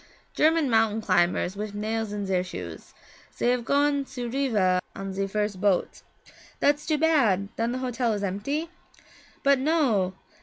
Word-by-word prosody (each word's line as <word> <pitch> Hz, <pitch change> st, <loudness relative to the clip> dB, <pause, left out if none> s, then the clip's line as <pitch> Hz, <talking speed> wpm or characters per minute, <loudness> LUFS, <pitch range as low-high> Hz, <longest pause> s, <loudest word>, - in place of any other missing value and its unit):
'German 315 Hz, -1 st, +3 dB
mountain 225 Hz, -2 st, +2 dB
climbers 185 Hz, -2 st, +1 dB
wif 205 Hz, 0 st, -5 dB
nails 220 Hz, +1 st, -2 dB
in 205 Hz, -1 st, -3 dB
zer 190 Hz, -2 st, +1 dB
shoes. 90 Hz, -, -8 dB, 0.4 s
Zey 240 Hz, -, +2 dB
have 250 Hz, -1 st, 0 dB
gone 285 Hz, +2 st, +2 dB
to 255 Hz, -2 st, -6 dB
Riva 210 Hz, -9 st, +2 dB
on 195 Hz, 0 st, -5 dB
ze 195 Hz, +1 st, -1 dB
first 210 Hz, -1 st, -2 dB
boat.' 200 Hz, -3 st, +1 dB, 0.6 s
'That's 290 Hz, +1 st, +2 dB
too 310 Hz, -1 st, +2 dB
bad 235 Hz, -, +2 dB
then 230 Hz, +1 st, -1 dB
the 255 Hz, -, -2 dB
hotel 245 Hz, -1 st, 0 dB
is 205 Hz, -1 st, -3 dB
empty?' 280 Hz, -, -2 dB, 0.7 s
'But 280 Hz, -1 st, +4 dB
no! 260 Hz, -, +1 dB
220 Hz, 155 wpm, -26 LUFS, 195-275 Hz, 0.7 s, But